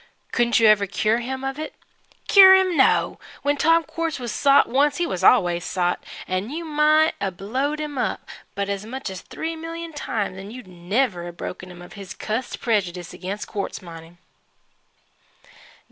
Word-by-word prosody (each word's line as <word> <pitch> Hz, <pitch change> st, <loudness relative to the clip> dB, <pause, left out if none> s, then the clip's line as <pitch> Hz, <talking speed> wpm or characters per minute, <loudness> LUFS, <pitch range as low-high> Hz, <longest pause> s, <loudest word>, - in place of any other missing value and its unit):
Couldn't 240 Hz, -1 st, +2 dB
you 225 Hz, -, +4 dB
ever 210 Hz, -2 st, +5 dB
cure 215 Hz, +4 st, +1 dB
him 260 Hz, +2 st, -5 dB
of 270 Hz, +2 st, -4 dB
it?" 310 Hz, -, -6 dB, 0.5 s
"Cure 380 Hz, -1 st, +9 dB
him! 375 Hz, -2 st, +2 dB
No! 265 Hz, -, +3 dB, 0.2 s
When 285 Hz, +1 st, +2 dB
Tom 330 Hz, +3 st, +3 dB
Quartz 325 Hz, 0 st, -3 dB
was 240 Hz, -4 st, -5 dB
sot 280 Hz, -1 st, +4 dB
once, 280 Hz, +3 st, +2 dB
he 345 Hz, -, 0 dB
was 185 Hz, -, -4 dB
always 175 Hz, -7 st, +4 dB
sot 180 Hz, -1 st, -1 dB, 0.2 s
and 185 Hz, +6 st, -2 dB
you 330 Hz, +3 st, -5 dB
might 310 Hz, +1 st, +3 dB
'a' 200 Hz, -, 0 dB
blowed 255 Hz, +11 st, -3 dB
him 295 Hz, -3 st, -4 dB
up -, -, -2 dB, 0.3 s
as 200 Hz, 0 st, -2 dB
much 240 Hz, -1 st, -6 dB
as 190 Hz, -, -7 dB
three 325 Hz, +1 st, -5 dB
million 330 Hz, 0 st, -7 dB
times 205 Hz, -9 st, -3 dB
'n' 195 Hz, +1 st, -9 dB
you'd 250 Hz, +3 st, -10 dB
never 180 Hz, +1 st, -2 dB
'a' 175 Hz, -, -8 dB
broken 180 Hz, +1 st, -7 dB
him 175 Hz, -1 st, -11 dB
of 175 Hz, -, -13 dB
his 195 Hz, -2 st, -9 dB
cussed 225 Hz, +4 st, -4 dB
prejudice 180 Hz, -7 st, -1 dB
ag'in 185 Hz, +2 st, -5 dB
quartz 200 Hz, -2 st, -5 dB
mining." 165 Hz, 0 st, -12 dB
235 Hz, 175 wpm, -23 LUFS, 190-300 Hz, 0.5 s, Cure